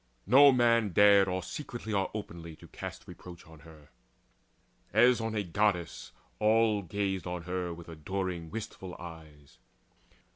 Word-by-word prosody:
No 140 +6 +7
man 115 -5 +2
dared 100 +1 +6
Or 90 0 -2
secretly 120 - -6
or 100 -1 0
openly 85 -6 -7
to - - -15
cast - - -9
Reproach 90 -2 -12
on 80 -1 -15
her. 75 0 -16 1.0
As 120 +2 +4
on 110 0 -3
a 105 - 0
Goddess 90 -1 -1 0.3
all 110 -1 +3
Gazed 95 0 -3
on 90 -1 -5
her 90 0 -3
with 85 0 -10
adoring 85 +1 -4
wistful 95 -2 -7
eyes. 80 -6 -12
95 Hz, 140 wpm, -30 LUFS, 85-110 Hz, 1.0 s, No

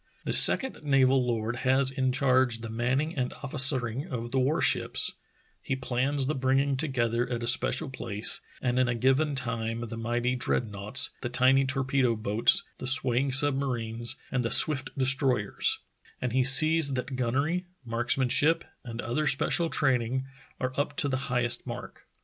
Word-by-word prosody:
The - - -2
second 265 -1 +6
naval 135 -3 +2
lord 115 -1 -3
has 130 +1 +4
in 130 -1 -1
charge 130 -3 +1
the 115 -1 -8
manning 130 +8 -2
and 125 -3 -3
officering 135 -1 0
of 120 -6 -6
the 135 - 0
war 135 +5 0
ships; - - +1 0.5
he 135 - -3
plans 130 +2 -1
the 150 - -2
bringing 135 +1 0
together 125 -4 -2
at 120 -1 -4
a - - -3
special 120 +6 +1
place 110 -5 -1 0.2
and 125 0 0
in 130 - +1
a 120 - -2
given 135 +5 0
time 115 -2 -3
the 115 - -7
mighty 120 +2 -2
dreadnoughts, 110 +1 +1
the 120 - -4
tiny 130 +2 +2
torpedo 130 -2 -1
boats, 110 - +2 0.2
the 130 - -6
swaying 130 0 +2
submarines, 125 -4 +1 0.2
and 125 -2 -1
the 115 - -2
swift 140 0 +4
destroy 130 -4 0
ers; - - -1 0.4
and 125 -2 -4
he 130 0 +2
sees 155 +1 +6
that 130 +1 -5
gunnery, 140 +9 -2 0.2
marksmanship, 130 +7 0 0.2
and 115 -1 -7
other 150 +6 -3
special 165 +4 +1
training 130 -3 -1 0.3
are 130 0 -3
up 145 0 -3
to 145 - +1
the 130 - -2
highest 125 -1 0
mark. - - -9
130 Hz, 160 wpm, -26 LUFS, 120-135 Hz, 0.5 s, second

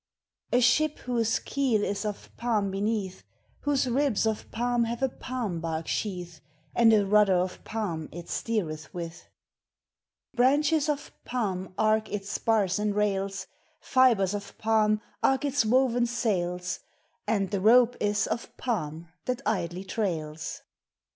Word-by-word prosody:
A 245 - +4
ship 300 +6 +3
whose 230 -3 0
keel 255 -7 0
is 200 +1 -2
of 210 -1 -6
palm 215 -5 0
beneath, 195 -1 -2 0.4
Whose 280 -2 +1
ribs 250 -3 +1
of 220 -1 -2
palm 240 0 +1
have 235 +3 -3
a 265 - +3
palm 240 -9 -4
bark 160 -1 -3
sheath, 175 -6 -3 0.3
And 230 -1 +6
a 210 -2 +4
rudder 205 -1 +5
of 180 +1 -1
palm 180 -8 -3
it 170 +1 -8
steeretb 160 -9 -3
with. 170 -1 -7 1.0
Branches 290 +4 +3
of 290 -1 -2
palm 190 -7 -3
arc 215 0 +2
its 200 -1 -4
spars 205 -4 +1
and 210 -1 0
rails, 195 -2 0 0.3
Fibres 235 -8 +3
of 200 -1 -6
palm 215 -1 +2 0.2
arc 270 +2 +2
its 285 -3 +2
woven 245 +1 +3 0.2
Bails, 180 -4 -1 0.5
And 200 -3 0
the 200 -2 -1
rope 240 +3 +6
is 205 0 +1
of 235 - -4
palm 170 -9 -3 0.2
thai 250 - +1 0.3
Ldlj 180 +3 -8
trails! 160 -8 -3
210 Hz, 140 wpm, -28 LUFS, 190-240 Hz, 1.0 s, And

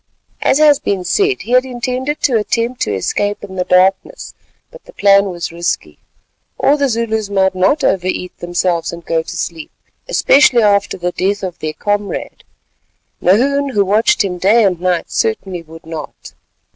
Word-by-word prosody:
As - - +3
has 295 -2 +5
been 195 -2 -2
said, 395 - 0
he 235 - -8
had 255 0 +5
intended 255 +3 -3
to 260 - +2
attempt 230 +3 -1
to 105 - 0
escape 205 - -2
in 190 -2 -9
the 180 - -1
darkness, 190 - +1 0.4
but - - -15
the - - -15
plan 200 0 +4
was 175 -2 -5
risky. 170 +1 -3 0.6
All 285 - +3
the 285 -2 0
Zulus 220 -3 -2
might 190 -1 +1
not 190 +11 +1
over 185 -1 +1
eat 180 -1 -4
themselves 175 -1 -1
and 170 0 -10
go 165 -1 0
to - - -8
sleep, 165 -2 -5 0.4
especially 275 - +4
after 200 -1 +2
the 180 0 -2
death 200 +3 -1
of 180 -2 -5
their 155 0 -4
comrade; 205 +4 -3 0.8
Nahoon, 275 +9 +2
who 200 -1 +3
watched 210 +3 +2
him 180 -2 -4
day 215 +6 +4
and 180 -3 0
night, 180 -2 -1
certainly 175 - -2
would 165 0 -14
not. 160 -2 -9
200 Hz, 170 wpm, -16 LUFS, 180-240 Hz, 0.8 s, has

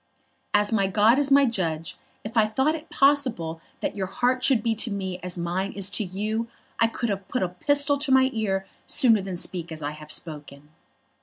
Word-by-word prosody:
As 205 +2 +3
my 200 -3 +2
God 215 +6 +4
is 285 -1 +2
my 280 0 +6
judge, 165 -9 -2 0.3
if 215 +2 -8
I 220 -2 +4
thought 265 +8 +1
it 320 0 -8
possible 255 - +1 0.2
that - - -2
your 190 -2 -3
heart 250 +5 0
should 250 -5 +3
be 230 - +1
to 225 +2 -1
me 190 -3 -4
as 180 0 -1
mine 175 +3 -2
is 200 0 -1
to 215 - -1
you, 215 +5 -3 0.3
I 230 - +5
could 230 +1 -3
have 195 -1 -4
put 250 - -1
a - - +1
pistol 285 +9 +2
to 285 -1 -1
my 260 0 +5
ear 195 -4 -1 0.2
sooner 230 -7 +4
than 190 -2 -5
speak 170 -1 -3
as 155 -1 -5
I 145 - -2
have 150 0 -10
spoken." 150 -2 -6
205 Hz, 210 wpm, -25 LUFS, 180-250 Hz, 0.3 s, my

